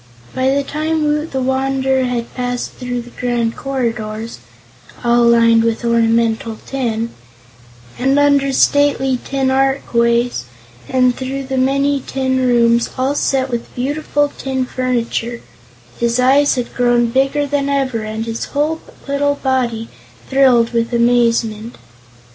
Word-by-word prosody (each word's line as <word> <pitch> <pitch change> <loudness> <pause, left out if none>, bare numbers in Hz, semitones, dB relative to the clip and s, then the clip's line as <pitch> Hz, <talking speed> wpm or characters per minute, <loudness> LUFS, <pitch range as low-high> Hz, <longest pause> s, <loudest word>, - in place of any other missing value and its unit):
By 260 0 +1
the 280 +1 +1
time 310 +2 -2
Woot 300 +1 -1
the 265 -1 -2
Wanderer 265 0 0
had 240 -2 -3
passed 245 -1 -3
through 245 -1 -5
the 240 - -14
grand 240 -2 -1
corridors 230 - -4 0.6
all 240 0 +3
lined 230 -1 +5
with 230 +1 -1
ornamental 230 -1 +1
tin 230 -4 -2 0.9
and 270 +2 +2
under 285 -1 +3
stately 270 -2 +2
tin 270 -1 -1
archways 240 - +1 0.4
and 255 -1 +3
through 270 +1 -4
the 265 0 -3
many 275 +2 +1
tin 260 0 -1
rooms 235 -1 +3
all 260 +2 +1
set 270 -2 0
with 235 -1 -5
beautiful 290 +2 -1
tin 265 -1 -2
furniture, 240 -2 -2 0.6
his 235 +1 +1
eyes 275 +3 +4
had 245 -2 -4
grown 240 -1 +2
bigger 275 +3 +1
than 285 0 -1
ever 265 -5 0
and 215 +1 -4
his 230 0 -4
whole 305 +3 -1 0.3
little 285 +1 +1
body 245 -5 -1 0.4
thrilled 255 -4 +4
with 230 0 0
amazement. 235 -1 +1
255 Hz, 130 wpm, -17 LUFS, 235-270 Hz, 0.9 s, lined